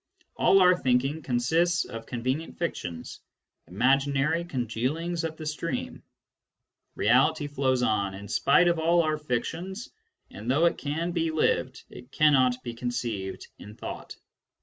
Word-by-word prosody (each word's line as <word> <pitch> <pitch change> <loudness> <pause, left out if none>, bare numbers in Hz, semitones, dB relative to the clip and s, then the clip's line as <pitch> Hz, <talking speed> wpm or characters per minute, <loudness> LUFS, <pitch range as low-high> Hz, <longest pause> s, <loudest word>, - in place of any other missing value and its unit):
All 195 - +4
our 180 0 +6
thinking 135 +1 0
consists 160 +7 +1
of 115 0 -8
convenient 130 +6 -3
fictions, 85 - -5 0.5
imaginary 135 - +1
congealings 150 +5 -2
of 160 -1 -4
the 155 - -7
stream: 155 -3 -4 0.9
reality 150 +5 +3
flows 130 -3 0
on 100 -4 0
in 100 +1 -9
spite 160 - +3
of 170 -1 +2
all 170 +1 +3
our 155 -1 -1
fictions, 165 - -4 0.4
and 110 +5 -7
though 145 +6 +3
it 170 - +1
can 160 +4 -2
be 165 -2 0
lived, 135 -4 0
it 125 +2 -12
cannot 130 -5 +3
be 120 - -5
conceived 115 -5 -4
in 105 +2 -11
thought. - - -7
140 Hz, 135 wpm, -27 LUFS, 125-165 Hz, 0.9 s, our